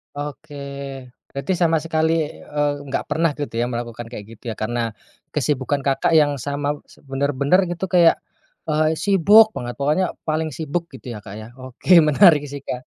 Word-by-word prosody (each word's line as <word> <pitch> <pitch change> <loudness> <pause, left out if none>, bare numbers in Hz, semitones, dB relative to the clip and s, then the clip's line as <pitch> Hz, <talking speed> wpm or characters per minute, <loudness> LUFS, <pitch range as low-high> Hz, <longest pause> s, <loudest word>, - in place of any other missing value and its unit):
Oke, 145 0 -7 0.8
berarti 140 +7 -2
sama 165 -2 +2
sekali, 160 0 0 0.2
eee, 145 0 -2
nggak 135 - -3
pernah 160 +1 +1
gitu 145 -4 -6
ya 115 - +1
melakukan 120 -1 -5
kayak 105 -4 -7
gitu 110 - -28
ya, - - -6
karena 115 +1 -1 0.4
kesibukan 145 0 0
Kakak 135 0 0
yang 150 -3 +4
sama 145 +2 -2 0.3
bener-bener 140 +6 +2
gitu 175 +2 -3
kayak, 170 -2 +4 0.5
eee, 155 0 +2
sibuk 205 +4 +5
banget, 120 0 -4
pokoknya 150 +7 +2 0.2
paling 155 0 -1
sibuk 160 +4 -3
gitu 125 -3 -8
ya 105 - -10
Kak 100 -2 -9
ya, 110 - -9
oke 130 -1 -12 0.2
menarik 150 -1 +6
sih 145 - -5
Kak. 125 -2 -6
145 Hz, 160 wpm, -21 LUFS, 130-160 Hz, 0.8 s, menarik